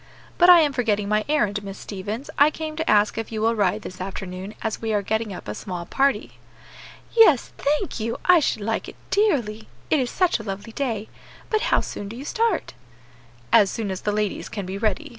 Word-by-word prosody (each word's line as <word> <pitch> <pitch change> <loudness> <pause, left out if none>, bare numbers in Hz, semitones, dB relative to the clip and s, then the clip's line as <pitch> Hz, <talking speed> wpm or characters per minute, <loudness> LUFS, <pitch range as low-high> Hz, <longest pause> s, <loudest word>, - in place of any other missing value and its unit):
But 350 0 +7
I 350 -2 +10
am 295 -3 +2
forgetting 215 -5 0
my 215 0 +2
errand, 210 -9 +1
Miss 195 0 -7
Stevens; 210 +6 -6
I 290 +2 +6
came 310 0 -6
to 320 - -2
ask 210 +1 +3
if 225 - -5
you 220 - -3
will 225 +2 +2
ride 200 -5 0
this 185 0 -8
afternoon, 190 +1 -6
as 220 -1 -2
we 225 -1 -2
are 205 -1 +1
getting 220 +1 -1
up 185 - -8
a 105 - -3
small 175 - -6
party." 275 +8 0 0.8
"Yes, 385 - +6
thank 300 +4 0
you, 230 +1 -2
I 360 -1 +7
should 220 -8 -1
like 225 +2 -2
it - - -12 0.2
dearly, 240 - +1 0.2
it 310 - +4
is 250 -2 0
such 365 -9 +1
a - - -7
lovely 200 +2 -6
day. 225 -6 -2 0.4
But 435 -1 +2
how - - +3
soon 205 - -6
do 225 - -8
you 265 +4 -8
start?" 450 +1 0 0.8
"As 200 - +6
soon 210 -2 -3
as 190 - -5
the 210 - 0
ladies 210 -1 -2
can 200 -3 -5
be 190 +2 -5
ready. 215 +8 -1
220 Hz, 215 wpm, -23 LUFS, 205-285 Hz, 0.8 s, I